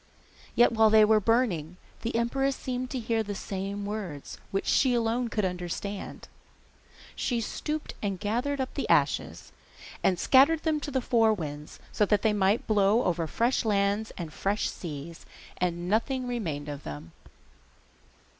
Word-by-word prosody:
Yet 240 - +5
while 220 -1 +5
they 215 0 +7
were 215 0 +5
burning 190 -8 +1 0.2
the 230 - -3
empress 270 +4 +1
seemed 255 0 -4
to 260 - -3
hear 225 -1 0
the 205 -2 -4
same 195 +1 -4
words, 200 -9 -6
which 195 - -2
she 255 -3 +3
alone 235 +1 0
could 215 -3 -1
understand. 180 +2 -4
Then - - -23 0.2
she 245 -3 -1
stooped 300 +7 -4
and 200 -3 -2
gathered 245 +7 -1
up 260 - -2
the - - -3
ashes, - - +1 0.5
and 185 - +3
scattered 280 - +5
them 315 -2 +1
to 290 - -5
the 260 -2 0
four 225 -3 +3
winds, 150 -4 -7
so 210 - +2
that 205 0 +2
they 220 - +3
might 205 +2 +2
blow 210 +2 +3
over 170 -2 0
fresh 240 +10 +1
lands 205 0 +1
and 165 -4 -6
fresh 205 +2 -1
seas, 160 0 -8 0.3
and 175 -1 -1
nothing 250 +5 0
remain 165 -12 -3
of 145 -1 -6
them. 75 - -8
210 Hz, 160 wpm, -28 LUFS, 180-240 Hz, 0.5 s, they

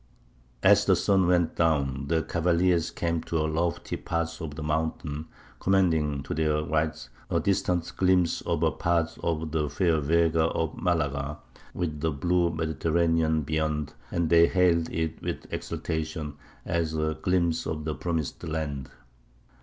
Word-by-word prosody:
"As - - +6
the - - +5
sun 95 -3 +3
went 85 -2 +2
down, 70 -4 +1
the 80 +1 +1
cavaliers 85 0 +2
came 85 -1 -1
to 85 - -2
a 75 - +1
lofty 80 +2 -1
part 85 0 -3
of 75 -3 -5
the 75 - -5
mountains, 75 0 -2 0.3
commanding, 80 -7 +2
to 70 - -4
their 75 0 +1
right, 80 +1 -1 0.2
a - - +2
distant 90 -3 0
glimpse 90 -2 +3
of - - -1
a - - +3
part 85 -1 0
of 80 -2 -1
the 75 -2 0
fair 85 -3 +2
Vega 80 +2 +2
of 80 -1 -1
Malaga, 75 -4 -1 0.4
with 80 -4 -3
the 80 - +1
blue 85 +4 +1
Mediterranean 80 0 +1
beyond, 75 0 -1 0.2
and 85 -2 -1
they 85 0 +7
hailed 85 -3 +3
it 80 -1 -3
with - - -4
exultation, 80 -2 -3 0.3
as 85 -2 -1
a 80 0 0
glimpse 85 -3 +1
of 75 -1 -3
the 80 - -1
promised 80 -4 -3
land. 75 -4 -3
80 Hz, 150 wpm, -27 LUFS, 75-85 Hz, 0.4 s, they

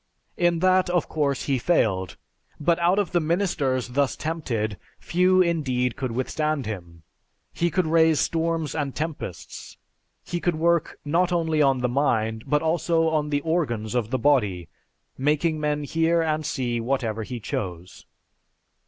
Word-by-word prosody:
In 175 -1 +2
that, 185 -1 +4
of 175 -2 +1
course, 140 -4 -1
he 135 -3 0
failed; 100 - +1 0.4
but 165 +3 +2
out 175 +3 +3
of 205 -5 0
the 175 - +2
ministers 155 -7 0
thus 135 0 0
tempted, 115 - -3 0.2
few 185 +1 +3
indeed 130 -8 0
could 130 -3 -3
withstand 145 +3 -1
him. 85 -6 -7 0.5
He 170 - 0
could 185 +1 0
raise 160 -1 +4
storms 165 -2 0
and 145 -4 -3
tempests. 155 - -6 0.5
He 175 - -3
could 175 -1 0
work, 170 +1 +1
not 175 +5 +1
only 160 -3 +1
on 135 -3 +3
the 125 - +2
mind, 115 -4 0
but 150 +1 +1
also 165 0 +2
on 155 -2 0
the 145 -1 0
organs 135 -10 -1
of 120 -3 -1
the 130 - 0
body, 105 - +1 0.5
making 155 +3 +1
men 150 -1 -1
hear 165 +3 +1
and 155 -1 -1
see 120 -3 -2
whatever 115 -3 -1
he 120 +2 -5
chose. 90 -4 -6
150 Hz, 155 wpm, -24 LUFS, 125-165 Hz, 0.5 s, that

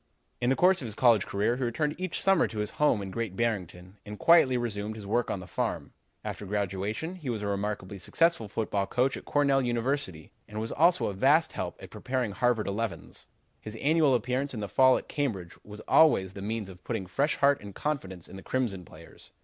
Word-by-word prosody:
"In 120 - +2
the 135 - +3
course 185 +2 +4
of - - -5
his 105 - -6
college 115 -5 +4
career 105 +5 0
he 130 - -2
returned 150 +5 -1
each 185 -2 -3
summer 195 -3 +4
to 110 - -9
his 105 0 -2
home 125 -9 +3
in 95 - -6
Great 110 -2 -4
Barrington 95 -4 -3
and 105 0 -8
quietly 150 -5 +5
resumed 110 -3 -3
his 105 -2 -9
work 115 +4 0
on 95 - -3
the - - -9
farm. 85 - -3 0.3
"After - - -5
graduation 100 - -2
he 150 -7 -6
was 110 -3 -3
a - - -2
remarkably 100 -1 -3
successful 165 - +1
football 100 -1 -2
coach 130 +2 +1
at - - -9
Cornell 140 -2 +2
University, 120 - -2 0.2
and 105 +1 -6
was 110 +1 -3
also 170 +4 +3
a 100 - -2
vast 145 - +3
help - - -5
in - - -10
preparing 125 -4 -2
Harvard 120 0 +1
elevens. 105 +2 -4 0.3
His 110 +1 -8
annual 150 +2 +3
appearance 125 +3 -1
in - - -4
the 105 - -3
fall 130 +5 +5
at - - -8
Cambridge 105 - -3
was 105 +1 -10
always 95 - +4
the 100 - -8
means 110 0 -3
of 90 -2 -13
putting 110 -6 -3
fresh 140 - 0
heart 140 0 +3
and 100 -1 -10
confidence 95 - -4
in 95 - -10
the - - -9
Crimson 115 -8 -2
players. 80 0 -15
115 Hz, 215 wpm, -28 LUFS, 100-135 Hz, 0.3 s, quietly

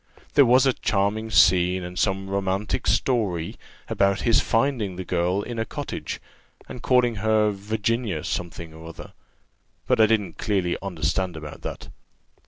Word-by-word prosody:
There 140 -3 +6
was 130 +3 +5
a 135 - +3
charming 110 +1 -1
scene, 90 -1 +4
and 90 +1 -6
some 95 -1 0
romantic 100 0 -1
story, 105 -5 0 0.3
about 100 0 +1
his 115 -2 +4
finding 115 -6 0
the 95 0 -6
girl 90 +3 0
in 120 -2 -5
a - - +1
cottage, - - -5 0.5
and 125 - -8
calling 125 -3 +2
her 110 0 +2
Virginia 105 -2 -2
something 85 -2 -5
or 80 +1 -11
other, 85 - -10 0.7
but - - +3
I 110 - +7
didn't 105 -5 0
clearly 95 -4 0
understand 90 -1 -2
about 75 -2 -9
that. - - -7
100 Hz, 150 wpm, -24 LUFS, 90-110 Hz, 0.7 s, I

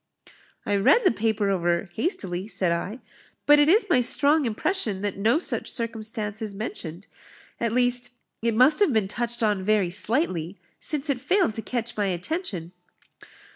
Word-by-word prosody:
"I 205 - +1
read 460 - +4
the - - +6
paper 220 -3 0
over 175 -1 -1
hastily," 195 - -2
said 185 -5 0
I; 190 +8 -3 0.4
"but 295 0 +6
it 295 +1 +4
is 420 +6 +4
my 330 -9 +3
strong 285 +4 +4
impression 220 - -1
that 205 -1 -2
no 220 +7 +2
such 340 - -2
circumstance 220 -2 -4
is 210 -2 -4
mentioned; 195 -4 -6 0.5
at 230 -1 -1
least, 245 +1 +1 0.3
it 230 -1 0
must 255 +6 +5
have 395 -10 +3
been 215 -3 +1
touched 235 +2 -2
on 205 -3 +1
very 205 -3 +1
slightly, 190 - 0 0.2
since 300 0 -2
it 260 - -2
failed 355 - +1
to 225 - -4
catch 240 0 -4
my 205 -2 0
attention." 180 - -4
220 Hz, 165 wpm, -25 LUFS, 195-255 Hz, 0.5 s, the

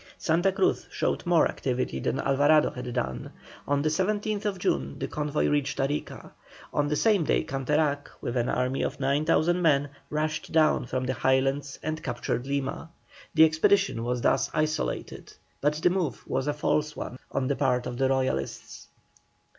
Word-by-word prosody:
Santa 175 +3 +2
Cruz 190 0 0
showed - - -1
more 170 -2 +5
activity 125 - -2
than - - -1
Alvarado 145 +3 +4
had 125 0 -6
done. 65 - -3 0.4
On 140 0 +1
the 155 - +2
17th 205 +3 -1
June 70 - -1
the - - -3
convoy 150 0 -1
reached 145 -1 0
Arica. 140 +2 -3 0.4
On 145 0 +1
that 150 - 0
same 205 +1 +3
day - - +1
Canterac, 145 +2 0
with 120 - -4
an 120 -1 +1
army 125 +1 0
of - - -2
9,000 155 +5 +2
men, 145 -4 +3 0.2
rushed 155 +1 -2
down 155 -5 +3
from 130 +1 -2
the 130 - 0
Highlands 135 +2 +1
and 155 +1 -3
captured 120 0 -3
Lima. 140 +3 -3 0.5
The 160 0 +8
expedition 160 -3 +2
was 125 0 -1
thus 135 +2 +2
isolated, 155 0 -2 0.3
but 150 +1 +2
the 165 +3 +2
move 175 -9 -2
was 135 +1 -1
a 145 - +1
false 150 0 0
one 125 - -6
on 135 - -1
the 140 - +1
part 125 -3 +1
of 125 -1 -5
the 135 -1 +2
Royalists. 130 - -2
145 Hz, 165 wpm, -27 LUFS, 130-155 Hz, 0.5 s, The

